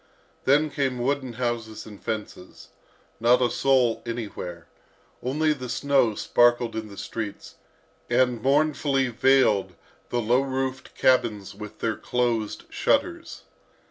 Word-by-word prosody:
Then 150 +3 +3
came 135 -3 -1
wooden 130 0 -1
houses 115 -2 -3
and 105 -2 -12
fences. 105 -5 -6 0.5
Not 120 +2 +4
a 125 -1 +2
soul 130 -4 +2
anywhere; 100 -8 -6 0.6
only 150 +5 +1
the 130 -4 -7
snow 135 -4 +2
sparkled 120 0 +2
in 110 -1 -4
the 100 -1 -12
streets, 105 +1 -6 0.5
and 125 -3 +2
mournfully 140 -1 +2
veiled 130 -4 +3 0.3
the 120 - 0
low 120 +3 +3
roofed 130 -1 -3
cabins 105 -6 +2
with 105 +1 -10
their 110 -2 0
closed 120 -3 -1
shutters. - - -1
120 Hz, 120 wpm, -25 LUFS, 110-135 Hz, 0.6 s, Not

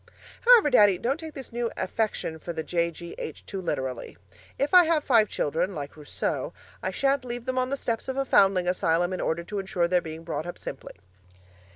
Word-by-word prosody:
However, 465 -12 +7
Daddy, 205 -6 +6
don't 265 - -1
take 320 -2 -8
this 265 -2 -8
new 240 0 -1
affection 190 -4 -2
for 170 - -6
the 160 -1 -3
J.G.H. 170 +1 -4
too 195 -2 -5
literally. 130 - -4 0.4
If 285 +4 -1
I 360 -1 +9
have 320 -2 +2
five 225 -6 +4
children, 170 +6 -1
like 145 -1 -6
Rousseau, 150 -2 -3 0.3
I - - -1
shan't 275 -1 +1
leave 245 -1 -6
them 255 0 -1
on 255 0 0
the 275 - -1
steps 230 -4 -3
of 265 0 -3
a 275 - +1
foundling 195 -6 +4
asylum 175 0 +1
in 185 - -3
order 170 +1 -1
to 205 +4 -4
insure 185 -3 0
their 180 0 +2
being 160 0 -8
brought 160 -1 -4
up 175 - -6
simply. - - -8
190 Hz, 200 wpm, -26 LUFS, 170-255 Hz, 0.4 s, I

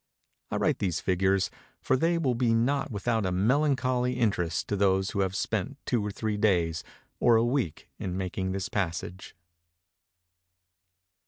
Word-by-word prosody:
I - - -3
write - - +1
these 90 -6 0
figures, 95 +1 +1 0.3
for - - +1
they 165 +5 +2
will 140 -7 +1
be 120 -1 +2
not 135 +5 +1
without 110 0 -1
a 95 - 0
melancholy 125 +4 +2
interest 100 -9 0
to 105 - 0
those 95 -1 +2
who - - -3
have 95 -1 0
spent 110 +7 -2
two 120 -4 0
or 105 - -2
three 105 +1 -2
days 85 -6 +1 0.4
or 120 - +5
a 115 +1 +4
week 120 - -1
in 90 -1 -3
making 95 0 -2
this 95 0 -2
passage. 95 0 -4
105 Hz, 155 wpm, -28 LUFS, 95-125 Hz, 0.4 s, or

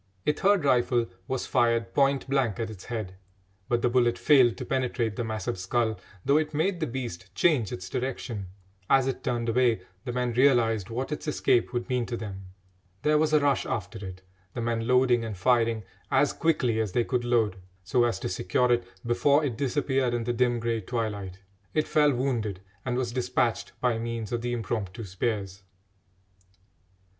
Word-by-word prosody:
A 150 - +3
third 195 0 +2
rifle 120 -2 +3 0.2
was 130 -1 -2
fired 115 -1 +1
point 140 -1 +2
blank 130 -5 0
at 115 -1 -2
its 95 -4 -11
head, 110 -6 -4 0.6
but 120 -1 +1
the - - +4
bullet 120 -1 +2
failed 130 -6 +5
to - - -5
penetrate 125 -4 -1
the 120 - -2
massive 110 -4 -3
skull, 110 +4 0 0.3
though 140 - +4
it 155 -1 -1
made 175 +4 +1
the 160 - -1
beast 115 -7 -5
change 125 - +2
its 90 +1 -6
direction. 120 -3 -4 0.4
As 135 -1 +5
it 135 -1 -3
turned 120 -3 -1
away 115 -3 +2 0.2
the 125 - -4
men 125 -1 -1
realised 115 -5 +3
what 130 +5 -3
its 150 - -4
escape 125 -5 +2
would 120 -1 -2
mean 125 -3 0
to 120 - -3
them. 95 -4 -7 0.6
There 150 0 +4
was 155 0 +2
a 155 - +5
rush 140 -2 +2
after 105 0 -4
it, 95 -1 -8 0.3
the - - -3
men 115 -1 -1
loading 125 -2 +4
and 110 -4 -5
firing 115 +1 +2 0.3
as - - +3
quickly 125 -9 +1
as 105 -5 -1
they 120 - +2
could 125 0 -1
load, 115 -5 +1 0.3
so 120 +6 +2
as 115 -5 0
to - - -2
secure 95 +7 +1
it 120 0 +3 0.2
before 140 +5 +3
it 130 -5 -2
disappeared 135 -1 0
in 120 - -1
the 120 +1 -1
dim 120 0 +1
grey 115 -1 -1
twilight. 100 -4 -4 0.3
It 155 - +2
fell 150 -1 +4
wounded, 120 -7 -1 0.2
and 125 -1 -1
was 125 -2 -1
despatched 125 -1 -1
by 120 -2 +1
means 115 -2 -4
of 120 -1 -1
the 120 0 -2
impromptu 115 -2 -3
spears. 100 0 -3
120 Hz, 185 wpm, -27 LUFS, 110-130 Hz, 0.6 s, failed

